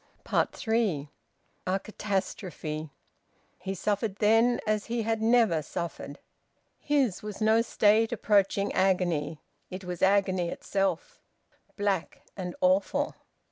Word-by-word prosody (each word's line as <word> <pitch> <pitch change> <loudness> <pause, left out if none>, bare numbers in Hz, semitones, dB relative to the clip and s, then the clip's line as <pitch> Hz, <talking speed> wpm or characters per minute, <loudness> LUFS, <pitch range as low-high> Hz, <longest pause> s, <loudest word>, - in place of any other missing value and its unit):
THREE. 210 -11 0 0.6
A 190 +1 +1
catastrophe! 185 -7 -4 0.7
He 195 +1 -4
suffered 205 +2 -1
then 225 +4 +3
as 215 -1 0
he 235 0 -1
had 225 0 -1
never 225 -8 +4
suffered. 160 -2 -6 0.6
His 275 -9 +1
was 210 -1 -7
no 220 +1 +4
state 225 0 +3
approaching 200 -3 +2
agony; 175 -5 +1 0.3
it 185 +1 -7
was 180 -1 -6
agony 190 -3 +3
itself, 200 - -2 0.6
black 200 -4 -1
and 180 -3 -5
awful. 280 +1 +2
200 Hz, 105 wpm, -28 LUFS, 180-225 Hz, 0.7 s, never